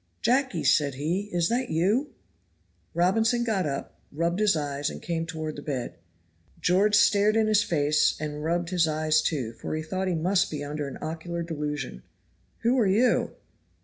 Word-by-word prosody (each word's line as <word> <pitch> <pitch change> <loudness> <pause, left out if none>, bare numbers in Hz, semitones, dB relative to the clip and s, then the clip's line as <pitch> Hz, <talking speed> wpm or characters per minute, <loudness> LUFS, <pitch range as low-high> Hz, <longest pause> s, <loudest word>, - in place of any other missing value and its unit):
"Jacky," 260 +3 +1
said 145 -4 +3
he, 175 +9 -2
"is 175 -1 +1
that 245 +2 -1
you?" 205 - +1 0.9
Robinson 225 +7 +2
got 210 -8 0
up, 140 -1 -5
rubbed 170 +5 -1
his 210 -4 +3
eyes, 145 -1 -2
and - - -7
came 165 -1 -3
toward 155 -2 -5
the 145 - -7
bed. 135 - -4 0.6
George 200 +4 +3
stared 210 +1 +4
in 225 -1 +3
his 215 -1 +4
face 150 -6 +2
and 150 -1 -4
rubbed 170 +2 -1
his 175 -3 +3
eyes, 155 0 +2
too, 130 -8 -2
for 135 - -5
he 155 - -3
thought 185 +4 -3
he 180 - 0
must 185 +4 +1
be 150 -2 -4
under 145 0 -4
an 135 - -7
ocular 165 +2 -4
delusion. 150 - -4 0.6
"Who 245 +3 +2
are 220 - +3
you?" 225 +6 +2
170 Hz, 175 wpm, -26 LUFS, 150-205 Hz, 0.9 s, stared